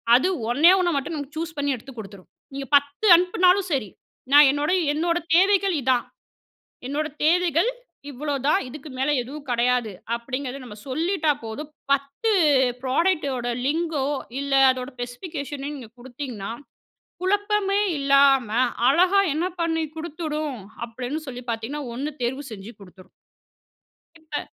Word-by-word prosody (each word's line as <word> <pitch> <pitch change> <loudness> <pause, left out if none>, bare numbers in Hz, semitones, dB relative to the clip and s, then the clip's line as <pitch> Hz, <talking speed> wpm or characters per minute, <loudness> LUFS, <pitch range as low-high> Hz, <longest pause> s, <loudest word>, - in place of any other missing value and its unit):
அது 265 +9 +3 0.2
ஒண்ணே 315 +8 +6
1 350 -3 +1
மட்டும் 290 +4 -3
நீங்க 285 0 -6
சூஸ் 325 -1 -5
பண்ணி 285 -1 0
எடுத்துக் 245 0 -12
கொடுத்துரும். 200 -3 -11 0.2
நீங்கப் 275 +1 -6
10 285 +7 -3
அனுப்புனாலும் 365 +1 +3
சரி, 230 -8 -1 0.4
"நான் 290 0 +9
என்னோட, 290 +3 -1 0.2
என்னோட 335 +3 0 0.2
தேவைகள் 390 0 +4
இதான். 255 -1 +1 0.8
என்னோட 295 +3 -2 0.2
தேவைகள் 345 - +3 0.4
இவ்வளவுதான். 280 +1 0
இதுக்கு 295 +3 -10
மேல 270 - +1
எதுவும் 280 +3 -10
கடையாது." 240 -1 +1 0.2
அப்டிங்கிறத 255 +3 -5
நம்ம 210 -3 -10
சொல்லிட்டா 315 +3 +1
போதும். 285 +8 -7 0.2
10 280 +11 -1 0.5
ப்ராடக்ட்டோ 285 0 +1 0.3
லிங்கோ 310 -1 0 0.3
இல்ல 280 0 -3 0.2
அதோட 255 0 -5
ஸ்பெசிபிகேஷன் 280 +3 -6
நீங்கக் 255 -6 -8
குடுத்தீங்கன்னா, 245 -5 -6 0.7
குழப்பமே 410 +1 +1 0.2
இல்லாம 275 -3 +4 0.4
அழகா 365 +7 +4
என்ன 320 +4 -1 0.2
பண்ணி 325 -1 0
கொடுத்துடும் 310 -3 -4 0.3
அப்படின்னு 245 +5 -5
சொல்லிப் 250 -1 -7
பாத்தீங்கன்னா, 230 +6 -3
1 275 +5 -3
தேர்வு 260 +4 -2
செஞ்சு 205 +1 -8
குடுத்துரும். 185 -1 -16 1.1
இப்ப, 310 -2 -5
285 Hz, 125 wpm, -24 LUFS, 255-325 Hz, 1.1 s, நான்